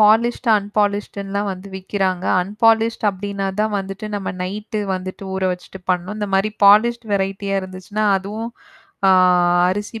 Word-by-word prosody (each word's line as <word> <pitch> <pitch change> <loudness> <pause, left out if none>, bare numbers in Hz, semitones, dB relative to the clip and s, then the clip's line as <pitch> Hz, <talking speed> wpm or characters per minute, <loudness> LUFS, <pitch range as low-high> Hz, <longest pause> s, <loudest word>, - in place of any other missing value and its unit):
Polished, 230 +3 +4
அன்பாலிஸ்டுன்லாம் 205 0 -2
வந்து 185 +2 -10
விக்கிறாங்க. 190 -1 -2 0.2
அன்பாலிஸ்ட் 225 +3 +2
அப்படின்னா 200 0 -4
தான் 215 0 0
வந்துட்டு 195 +2 -6
நம்ம 195 -1 -4
நைட்டு 210 +3 -4
வந்துட்டு 185 +1 -6
ஊற 190 - -3
வச்சுட்டு 180 +1 -10
பண்ணணும். 180 +4 -1
இந்த 205 -1 -2
மாரி 195 +2 +2
பாலிஸ்ட் 230 +3 +5
வெரைட்டியா 195 0 -1
இருந்துச்சுன்னா, 185 +3 -4
அதுவும், 215 +4 -5 0.6
ஆ, - - +7 0.6
அரிசி 205 +3 -4
200 Hz, 130 wpm, -20 LUFS, 190-215 Hz, 0.6 s, ஆ